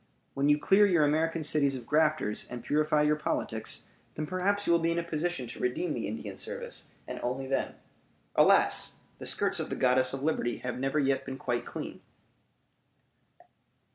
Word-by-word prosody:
When 140 Hz, +1 st, +1 dB
you 145 Hz, -, +5 dB
clear 195 Hz, +7 st, +5 dB
your 170 Hz, -6 st, +4 dB
American 160 Hz, +2 st, +1 dB
cities 145 Hz, -2 st, +2 dB
of 125 Hz, -3 st, -7 dB
grafters, 150 Hz, -7 st, +1 dB
and 125 Hz, -1 st, -7 dB
purify 150 Hz, 0 st, +2 dB
your 150 Hz, 0 st, +3 dB
politics, 150 Hz, -, -2 dB, 0.3 s
then 155 Hz, -, -2 dB
perhaps 195 Hz, +4 st, 0 dB
you 170 Hz, -, +3 dB
will 170 Hz, -, +4 dB
be 165 Hz, 0 st, +1 dB
in 170 Hz, -, -1 dB
a 170 Hz, -, 0 dB
position 170 Hz, -3 st, -2 dB
to 120 Hz, -, -9 dB
redeem 125 Hz, +8 st, -1 dB
the -, -, -3 dB
Indian -, -, -5 dB
service, 485 Hz, +1 st, -6 dB, 0.2 s
and -, -, -5 dB
only 130 Hz, +2 st, -2 dB
then. 135 Hz, 0 st, -1 dB, 0.6 s
Alas! -, -, +4 dB, 0.2 s
the -, -, -1 dB
skirts -, -, +2 dB
of -, -, -3 dB
the -, -, -2 dB
Goddess 130 Hz, 0 st, +3 dB
of 135 Hz, 0 st, -5 dB
Liberty 145 Hz, -6 st, 0 dB
have 125 Hz, 0 st, -5 dB
never 135 Hz, +3 st, 0 dB
yet 135 Hz, -2 st, +2 dB
been 135 Hz, 0 st, -6 dB
quite 120 Hz, -2 st, -2 dB
clean! -, -, -6 dB
150 Hz, 180 wpm, -29 LUFS, 130-165 Hz, 0.6 s, you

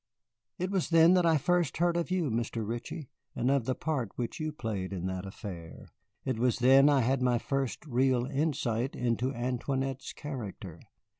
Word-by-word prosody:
"It 185 Hz, +2 st, -2 dB
was 190 Hz, -4 st, 0 dB
then 165 Hz, +1 st, +6 dB
that 180 Hz, -2 st, +4 dB
I 160 Hz, -1 st, +5 dB
first 175 Hz, 0 st, +1 dB
heard 175 Hz, +1 st, +2 dB
of 170 Hz, +1 st, -1 dB
you, 180 Hz, -7 st, 0 dB
Mr. 115 Hz, -1 st, -2 dB
Ritchie, 120 Hz, +5 st, -5 dB, 0.2 s
and 125 Hz, +3 st, +1 dB
of 140 Hz, -4 st, +2 dB
the 130 Hz, -, 0 dB
part 145 Hz, -9 st, -2 dB
which 120 Hz, +8 st, -4 dB
you 155 Hz, 0 st, -2 dB
played 105 Hz, -9 st, -4 dB
in 90 Hz, -2 st, -4 dB
that 95 Hz, 0 st, -3 dB
affair. 90 Hz, -4 st, -9 dB, 0.4 s
It 130 Hz, -4 st, -1 dB
was 125 Hz, -1 st, +2 dB
then 135 Hz, +3 st, +6 dB
I 140 Hz, -2 st, +4 dB
had 130 Hz, +2 st, +1 dB
my 125 Hz, -1 st, +3 dB
first 135 Hz, +3 st, -2 dB
real 130 Hz, -2 st, +2 dB
insight 135 Hz, -4 st, -1 dB
into 120 Hz, +1 st, 0 dB
Antoinette's 130 Hz, +2 st, -2 dB
character. 105 Hz, -, -7 dB
130 Hz, 175 wpm, -30 LUFS, 115-150 Hz, 0.4 s, then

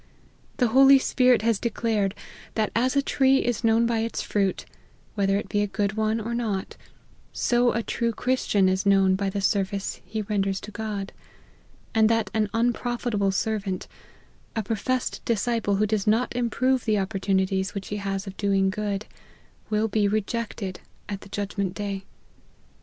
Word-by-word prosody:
The 245 Hz, -3 st, +2 dB
Holy 270 Hz, +3 st, +7 dB
Spirit 250 Hz, -4 st, +3 dB
has 225 Hz, -3 st, +2 dB
declared, 220 Hz, -4 st, 0 dB, 0.4 s
that 215 Hz, -2 st, 0 dB
as 255 Hz, +4 st, +2 dB
a 280 Hz, -, +3 dB
tree 270 Hz, -1 st, +3 dB
is 245 Hz, -1 st, -1 dB
known 225 Hz, +1 st, +4 dB
by 230 Hz, -1 st, +1 dB
its 230 Hz, +1 st, -2 dB
fruits, 195 Hz, -2 st, -1 dB, 0.5 s
whether 195 Hz, -1 st, +1 dB
it 205 Hz, -, -4 dB
be 205 Hz, -1 st, 0 dB
a 205 Hz, -, +1 dB
good 200 Hz, 0 st, -1 dB
one 220 Hz, +1 st, 0 dB
or 225 Hz, +2 st, -4 dB
not, 215 Hz, -5 st, -2 dB, 0.6 s
so 240 Hz, 0 st, +2 dB
a 230 Hz, -, -1 dB
true 235 Hz, +1 st, -1 dB
Christian 225 Hz, -5 st, +1 dB
is 185 Hz, 0 st, +1 dB
known 195 Hz, -1 st, +4 dB
by 195 Hz, +1 st, 0 dB
the 200 Hz, +1 st, -3 dB
service 195 Hz, 0 st, -1 dB
he 215 Hz, +4 st, -4 dB
renders 195 Hz, -2 st, -1 dB
to 210 Hz, -, -9 dB
God: 210 Hz, -2 st, -4 dB, 0.8 s
and 220 Hz, -1 st, +4 dB
that 225 Hz, -3 st, +1 dB
an 215 Hz, -1 st, +1 dB
unprofitable 235 Hz, -3 st, 0 dB
servant, 195 Hz, -1 st, -2 dB, 0.7 s
a 220 Hz, -, -1 dB
professed 230 Hz, +5 st, -2 dB
disciple 230 Hz, -2 st, 0 dB
who 210 Hz, +2 st, +2 dB
does 210 Hz, -1 st, -1 dB
not 225 Hz, +3 st, +2 dB
improve 250 Hz, +2 st, +1 dB
the 215 Hz, -2 st, +2 dB
opportunities 190 Hz, -1 st, 0 dB
which 195 Hz, -1 st, -5 dB
he 210 Hz, -, -3 dB
has 195 Hz, -1 st, -3 dB
of 195 Hz, -1 st, -8 dB
doing 195 Hz, -1 st, +2 dB
good, 205 Hz, 0 st, -3 dB, 0.6 s
will 215 Hz, +1 st, +1 dB
be 210 Hz, -1 st, +1 dB
rejected 210 Hz, -2 st, -2 dB, 0.3 s
at 200 Hz, -1 st, -5 dB
the -, -, -13 dB
judgment 200 Hz, -2 st, -3 dB
day. 200 Hz, -2 st, -4 dB
210 Hz, 165 wpm, -25 LUFS, 195-230 Hz, 0.8 s, Holy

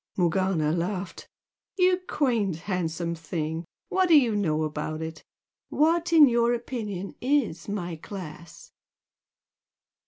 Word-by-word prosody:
Morgana 175 Hz, -3 st, +1 dB
laughed. 180 Hz, +3 st, -3 dB, 0.5 s
"You 365 Hz, 0 st, +4 dB
quaint, 230 Hz, -, +1 dB
handsome 170 Hz, -1 st, -2 dB
thing! 160 Hz, 0 st, -4 dB, 0.2 s
What 375 Hz, 0 st, +2 dB
do 325 Hz, -3 st, +7 dB
you 235 Hz, -5 st, +1 dB
know 160 Hz, -6 st, +1 dB
about 155 Hz, 0 st, -3 dB
it? 160 Hz, 0 st, -7 dB, 0.5 s
What, 335 Hz, +3 st, +2 dB
in 315 Hz, -3 st, +8 dB
your 235 Hz, 0 st, +3 dB
opinion, 215 Hz, -6 st, -5 dB
IS 245 Hz, -, 0 dB
my 175 Hz, -5 st, -3 dB
class?" 170 Hz, -2 st, -10 dB
190 Hz, 115 wpm, -26 LUFS, 165-245 Hz, 0.5 s, in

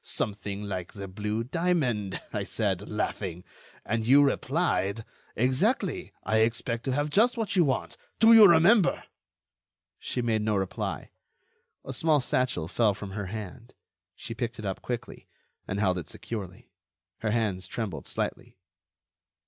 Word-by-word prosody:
'Something 100 Hz, -1 st, -3 dB
like 95 Hz, -4 st, -5 dB
the 100 Hz, -1 st, -7 dB
blue 105 Hz, +4 st, -3 dB
diamond,' 130 Hz, -, 0 dB
I -, -, -1 dB
said, 100 Hz, -3 st, -2 dB
laughing; 95 Hz, -4 st, -3 dB, 0.4 s
and 115 Hz, +1 st, -1 dB
you 135 Hz, +5 st, +6 dB
replied: 120 Hz, -, 0 dB, 0.3 s
'Exactly, 155 Hz, -, 0 dB
I 110 Hz, -, +1 dB
expect 115 Hz, +1 st, 0 dB
to 135 Hz, -, 0 dB
have 145 Hz, +2 st, -1 dB
just 235 Hz, +8 st, +3 dB
what 220 Hz, -3 st, -1 dB
you 180 Hz, -, +5 dB
want.' 135 Hz, -4 st, -1 dB, 0.2 s
Do 225 Hz, +1 st, +8 dB
you 220 Hz, -2 st, +10 dB
remember?" 175 Hz, +5 st, +5 dB, 1.0 s
She 125 Hz, -, -3 dB
made 110 Hz, -2 st, +1 dB
no 105 Hz, 0 st, +1 dB
reply. 95 Hz, -2 st, -3 dB, 0.7 s
A 135 Hz, -, -5 dB
small 155 Hz, +3 st, +3 dB
satchel 125 Hz, -, 0 dB
fell 105 Hz, +2 st, +2 dB
from 100 Hz, -1 st, -7 dB
her 100 Hz, 0 st, -4 dB
hand. 110 Hz, +4 st, -8 dB, 0.4 s
She 115 Hz, -, -6 dB
picked 120 Hz, 0 st, -4 dB
it 110 Hz, -, -7 dB
up 95 Hz, -1 st, -3 dB
quickly, 120 Hz, -2 st, -6 dB, 0.4 s
and 95 Hz, -, -2 dB
held 95 Hz, -3 st, +2 dB
it 85 Hz, -, -9 dB
securely. 105 Hz, 0 st, -7 dB, 0.5 s
Her 110 Hz, -, -1 dB
hands 105 Hz, -5 st, -1 dB
trembled 100 Hz, -4 st, -4 dB
slightly. -, -, -4 dB
115 Hz, 145 wpm, -28 LUFS, 100-135 Hz, 1.0 s, you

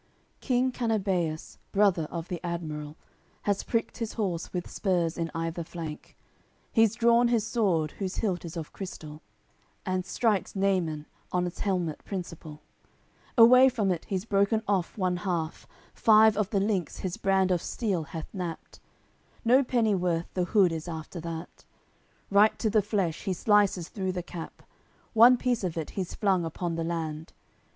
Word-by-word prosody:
CCXLVIII -, -, -39 dB
King 255 Hz, 0 st, +2 dB
Canabeus, 195 Hz, -10 st, -1 dB
brother 195 Hz, -6 st, +3 dB
of 170 Hz, 0 st, -5 dB
the 175 Hz, -1 st, -5 dB
admiral, 155 Hz, -3 st, -4 dB, 0.5 s
Has 200 Hz, -1 st, +1 dB
pricked 230 Hz, +1 st, -2 dB
his 230 Hz, -2 st, -3 dB
horse 185 Hz, -7 st, -2 dB
with 180 Hz, -1 st, -3 dB
spurs 175 Hz, -4 st, 0 dB
in 165 Hz, -1 st, -2 dB
either 165 Hz, +1 st, -2 dB
flank; 160 Hz, -2 st, -8 dB, 0.6 s
He's 225 Hz, -2 st, +4 dB
drawn 235 Hz, +1 st, +4 dB
his 230 Hz, -3 st, +1 dB
sword, 185 Hz, -10 st, +1 dB
whose 190 Hz, -2 st, -3 dB
hilt 190 Hz, -6 st, -1 dB
is 170 Hz, 0 st, -7 dB
of 160 Hz, -2 st, -6 dB
crystal, 155 Hz, -5 st, -8 dB, 0.6 s
And 185 Hz, -1 st, -1 dB
strikes 210 Hz, +1 st, 0 dB
Naimun 185 Hz, -6 st, 0 dB, 0.3 s
on's 180 Hz, -1 st, -1 dB
helmet 180 Hz, -6 st, -1 dB
principal; 165 Hz, -5 st, -7 dB, 0.7 s
Away 255 Hz, +3 st, +8 dB
from 215 Hz, -6 st, 0 dB
it 170 Hz, -3 st, -3 dB
he's 190 Hz, 0 st, -3 dB
broken 205 Hz, +1 st, +2 dB
off 195 Hz, -2 st, 0 dB
one 185 Hz, -3 st, 0 dB
half, 175 Hz, -4 st, -3 dB, 0.3 s
Five 220 Hz, 0 st, +6 dB
of 210 Hz, -1 st, 0 dB
the 200 Hz, -, +1 dB
links 195 Hz, -4 st, -1 dB
his 185 Hz, -2 st, -3 dB
brand 190 Hz, -1 st, +2 dB
of 175 Hz, -2 st, +1 dB
steel 195 Hz, -9 st, -2 dB
hath 155 Hz, +2 st, -8 dB
knapped; 175 Hz, -4 st, -6 dB, 0.7 s
No 255 Hz, +4 st, +5 dB
pennyworth 190 Hz, -9 st, 0 dB
the 180 Hz, -1 st, 0 dB
hood 190 Hz, -2 st, +4 dB
is 160 Hz, +1 st, -5 dB
after 160 Hz, +1 st, -6 dB
that; 165 Hz, 0 st, -7 dB, 0.7 s
Right 205 Hz, +2 st, +5 dB
to 220 Hz, -, 0 dB
the 215 Hz, 0 st, +4 dB
flesh 195 Hz, -5 st, -2 dB
he 190 Hz, -, 0 dB
slices 200 Hz, -2 st, +2 dB
through 190 Hz, -4 st, -3 dB
the 180 Hz, -1 st, -3 dB
cap; 170 Hz, -2 st, -9 dB, 0.5 s
One 240 Hz, +3 st, +8 dB
piece 245 Hz, -3 st, 0 dB
of 175 Hz, -3 st, -2 dB
it 160 Hz, -, -4 dB
he's 185 Hz, -3 st, -4 dB
flung 190 Hz, -4 st, +2 dB
upon 165 Hz, +1 st, -3 dB
the 165 Hz, 0 st, -2 dB
land. 160 Hz, -2 st, -4 dB
185 Hz, 160 wpm, -28 LUFS, 165-210 Hz, 0.7 s, Away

